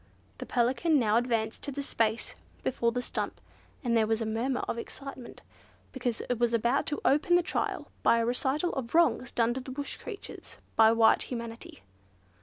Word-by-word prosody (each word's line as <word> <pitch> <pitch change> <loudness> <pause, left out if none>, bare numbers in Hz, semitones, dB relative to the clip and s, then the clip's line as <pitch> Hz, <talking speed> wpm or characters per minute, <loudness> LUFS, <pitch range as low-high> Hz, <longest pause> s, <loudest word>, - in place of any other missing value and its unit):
The - - -6
Pelican 260 +7 +2
now 220 -4 +3
advanced 230 -2 0
to 285 - -4
the 280 +1 -4
space 225 -3 0 0.3
before 235 -2 +1
the 245 +1 -2
stump, - - -3 0.4
and 235 -2 +1
there 220 -1 +3
was 225 0 +1
a 225 - -2
murmur 235 +4 -1
of 230 - -3
excitement, 265 0 -9 0.5
because 245 -4 -2
it 245 -2 -1
was 240 -1 +2
about 235 +4 +2
to 295 - -2
open 300 +5 +4
the 350 - +4
trial - - -2
by 235 - +4
a 230 - +1
recital 270 +7 0
of 265 0 -4
wrongs 330 -7 +3
done 235 0 +2
to 260 - -4
the 255 - -10
Bush 280 +2 -4
creatures 435 -5 -9 0.2
by 220 0 +7
white 225 -1 +5
humanity. 230 - -7
240 Hz, 185 wpm, -29 LUFS, 230-275 Hz, 0.5 s, by